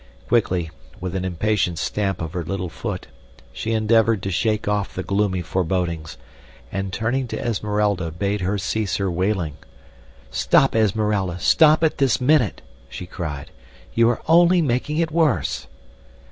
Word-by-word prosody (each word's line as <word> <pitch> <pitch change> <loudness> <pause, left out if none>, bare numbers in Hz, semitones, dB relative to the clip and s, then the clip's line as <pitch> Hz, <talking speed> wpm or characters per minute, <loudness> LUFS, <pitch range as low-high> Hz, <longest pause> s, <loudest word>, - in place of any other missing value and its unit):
Quickly, 90 -8 +1 0.3
with 90 -1 -4
an 95 - -1
impatient 95 -1 0
stamp 95 -2 -1
of 80 - -6
her 90 - -2
little 90 +1 -3
foot, 80 - -5 0.5
she 115 - -3
endeavored 110 -1 +3
to 95 - -2
shake 105 +3 0
off 105 -1 -1
the 95 - -3
gloomy 100 -2 0
forebodings, 85 -3 -2 0.5
and 95 0 -3
turning 120 +6 -1
to - - -5
Esmeralda 105 -5 0
bade 100 +5 -2
her 95 +3 0
cease 105 +1 -1
her 95 -2 -1
wailing. 90 -4 -1 0.7
"Stop, 135 -2 +3
Esmeralda, 105 -4 +1
stop 155 - +5
it 160 - +1
this 135 -3 +3
minute!" 130 - +2 0.3
she 90 - -7
cried. 80 -6 -6 0.4
"You 115 0 +4
are 120 - -2
only 175 +2 +5
making 145 0 0
it 165 -1 0
worse." 155 - +1
100 Hz, 145 wpm, -22 LUFS, 90-115 Hz, 0.7 s, stop